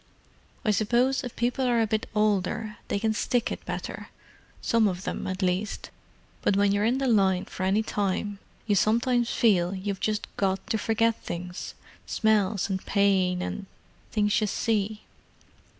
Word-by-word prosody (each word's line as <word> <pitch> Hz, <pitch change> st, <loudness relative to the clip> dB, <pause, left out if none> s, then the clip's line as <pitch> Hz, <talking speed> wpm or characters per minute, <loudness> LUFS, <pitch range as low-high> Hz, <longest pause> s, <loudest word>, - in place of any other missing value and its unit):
I 215 Hz, -, +4 dB
suppose 240 Hz, +6 st, +2 dB
if 245 Hz, -, -6 dB
people 245 Hz, +3 st, 0 dB
are 240 Hz, -1 st, +3 dB
a 225 Hz, -, +3 dB
bit 220 Hz, 0 st, -2 dB
older 210 Hz, +1 st, 0 dB
they -, -, 0 dB
can 220 Hz, +1 st, +1 dB
stick 240 Hz, +2 st, 0 dB
it -, -, -5 dB
better—some 230 Hz, -2 st, -3 dB
of 185 Hz, -1 st, -3 dB
them, -, -, -3 dB
at 190 Hz, +1 st, -3 dB
least. 185 Hz, +3 st, -1 dB, 0.5 s
But 195 Hz, -, +2 dB
when 200 Hz, 0 st, +4 dB
you're 205 Hz, +1 st, +2 dB
in 240 Hz, +3 st, +2 dB
the 270 Hz, -, -1 dB
line 190 Hz, -5 st, +3 dB
for -, -, -9 dB
any 195 Hz, +4 st, +2 dB
time, 205 Hz, -1 st, -2 dB, 0.3 s
you 210 Hz, -, +2 dB
sometimes 235 Hz, +4 st, +2 dB
feel 190 Hz, -5 st, +2 dB
you've 195 Hz, 0 st, -3 dB
just 215 Hz, 0 st, -1 dB
got 190 Hz, -1 st, 0 dB
to 220 Hz, -, +1 dB
forget 225 Hz, +1 st, +1 dB
things—smells 195 Hz, +3 st, -2 dB
and 190 Hz, -1 st, -3 dB
pain, 190 Hz, -3 st, +2 dB
and—things 205 Hz, +2 st, -3 dB
you 215 Hz, -, +1 dB
see." 215 Hz, 0 st, -1 dB
210 Hz, 150 wpm, -27 LUFS, 195-225 Hz, 0.5 s, I